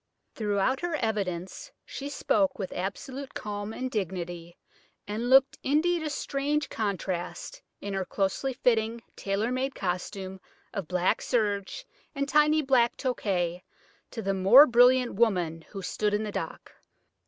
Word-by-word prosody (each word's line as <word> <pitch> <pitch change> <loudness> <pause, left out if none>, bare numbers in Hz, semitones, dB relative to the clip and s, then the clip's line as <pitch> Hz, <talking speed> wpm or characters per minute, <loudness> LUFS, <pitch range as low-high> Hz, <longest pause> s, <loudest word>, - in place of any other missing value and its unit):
Throughout 210 +4 0
her 350 -2 -2
evidence 195 - -3
she 280 +1 -6
spoke 285 0 +1
with 190 -3 -4
absolute 255 +9 -5
calm 205 0 -4
and 255 +3 -4
dignity, 175 -4 -4 0.5
and 220 +4 -2
looked 270 +1 +5
indeed 330 +5 +2
a 310 - -2
strange 285 0 -1
contrast, 200 - -3 0.2
in 200 - -4
her 195 -1 -1
closely 195 +8 -1
fitting 230 -2 +1
tailor 200 +4 -1
made 265 +2 -1
costume 190 +1 -4 0.3
of 195 -6 -4
black 180 +3 +1
serge 210 - -1 0.3
and 280 0 -1
tiny 300 +2 +4
black 255 -3 +3
toque, 185 -9 -1 0.5
to 225 - -6
the 195 0 0
more 195 +10 +8
brilliant 245 0 +5
woman 180 -7 +1
who 195 -2 -7
stood 210 +2 0
in 210 - -1
the 210 - -4
dock. - - -6
220 Hz, 140 wpm, -28 LUFS, 190-265 Hz, 0.5 s, more